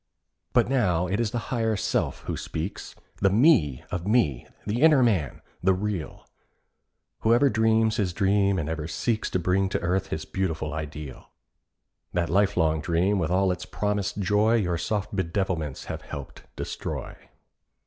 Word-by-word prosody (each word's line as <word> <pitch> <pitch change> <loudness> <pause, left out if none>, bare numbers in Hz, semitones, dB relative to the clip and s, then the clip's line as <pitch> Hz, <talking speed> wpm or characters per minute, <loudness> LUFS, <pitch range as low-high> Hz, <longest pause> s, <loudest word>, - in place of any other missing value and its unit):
But - - +4
now 100 -10 +2
it 95 +4 -1
is 115 -2 +1
the 120 +2 -4
Higher 115 -2 +1
Self 100 - -1
who - - -3
speaks— 85 +5 -5 0.2
The 95 - +3
Me 100 - +4
of 90 +1 -3
me—the 105 - 0
inner 150 -4 +6
Man—the 95 - 0
real— 95 -6 -4 0.9
Whoever 120 +5 +4
dreams 110 0 +2
his 95 -4 0
dream 100 +1 +2
and 80 -4 -2
ever 80 -1 -3
seeks 110 +7 -1
To - - 0
bring 95 +2 +1
to - - -1
earth 90 +2 0
his 80 - -4
beautiful 80 -5 -2
ideal. 75 -3 -7 0.8
That 85 -1 0
lifelong 85 -5 +2
dream 90 +5 +1
with 80 -3 0
all 95 +1 +2
its 90 - -5
promised 105 -1 -2
joy 105 +3 +3
Your 90 -7 0
soft 105 +2 -2
bedevilments 85 -5 -2
have - - -5
helped 70 -1 -9
destroy. - - -5
95 Hz, 150 wpm, -26 LUFS, 85-105 Hz, 0.9 s, inner